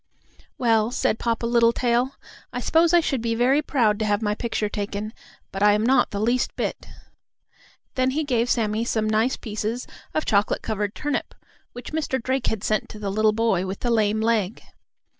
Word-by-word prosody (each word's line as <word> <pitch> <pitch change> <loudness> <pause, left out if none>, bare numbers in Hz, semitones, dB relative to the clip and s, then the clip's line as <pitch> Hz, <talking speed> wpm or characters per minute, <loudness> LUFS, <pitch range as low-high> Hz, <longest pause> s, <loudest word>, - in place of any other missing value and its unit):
"Well," 225 -3 +2
said 230 -2 0
Papa 230 0 -1
Littletail, 235 +2 +2 0.4
"I 245 - -3
suppose 325 +6 +3
I 345 -1 +5
should 270 -6 -1
be 230 0 -1
very 260 +5 +3
proud 230 -8 +1
to 220 - 0
have 205 -1 +1
my 210 -1 +1
picture 220 -1 -2
taken, 205 +1 -4 0.4
but 195 - -5
I 205 0 +6
am 210 +1 +1
not 265 +2 +4
the 200 - -4
least 240 +4 0
bit." - - -3 1.1
Then 255 0 +1
he 300 +4 -1
gave 245 -4 0
Sammie 220 -2 +1
some 220 -2 0
nice 220 +4 +1
pieces 220 +2 -4 0.3
of 310 - 0
chocolate 205 -1 +1
covered 210 -1 -2
turnip, 295 -1 -3 0.4
which 245 +4 -9
Mr. 300 -4 -1
Drake 260 +2 -1
had 220 -2 -2
sent 215 - 0
to - - -9
the 205 -2 -3
little 215 +1 +3
boy 215 -4 +1
with 190 +1 -5
the 240 - 0
lame 215 -1 +2
leg. 220 -3 0
230 Hz, 185 wpm, -24 LUFS, 210-250 Hz, 1.1 s, I